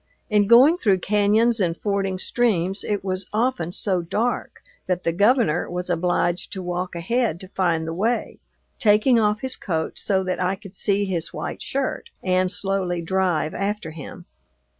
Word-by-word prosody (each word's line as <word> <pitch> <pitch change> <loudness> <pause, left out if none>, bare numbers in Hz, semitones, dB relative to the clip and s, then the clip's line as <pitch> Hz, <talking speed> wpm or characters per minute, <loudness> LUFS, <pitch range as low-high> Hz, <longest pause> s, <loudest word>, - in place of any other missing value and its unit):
In 205 -1 +3
going 265 - +7
through 200 - +3
cañons 210 +3 +2
and 170 -1 -1
fording 195 -2 -1
streams 195 -3 0
it 205 -2 -2
was 185 -1 -2
often 215 -7 0
so 185 -1 0
dark 220 +8 -2 0.2
that 180 -1 -1
the 170 - +1
Governor 205 - +2
was 180 0 -3
obliged 175 0 0
to 190 - -4
walk 180 0 -3
ahead 200 +1 0
to 190 - -8
find 170 -4 0
the 165 - -3
way, 225 +7 -1 0.4
taking 220 +3 +4
off 210 -1 +1
his 260 -1 -1
coat 160 -4 -3
so 190 -2 +1
that 185 0 -2
I 185 +1 +1
could 195 0 -13
see 200 +1 0
his 175 -4 -3
white - - -5
shirt 275 - -3
and 185 0 +1
slowly 185 -3 -2
drive 180 -3 0
after 200 -4 -3
him. 155 -3 -9
190 Hz, 165 wpm, -23 LUFS, 175-210 Hz, 0.4 s, going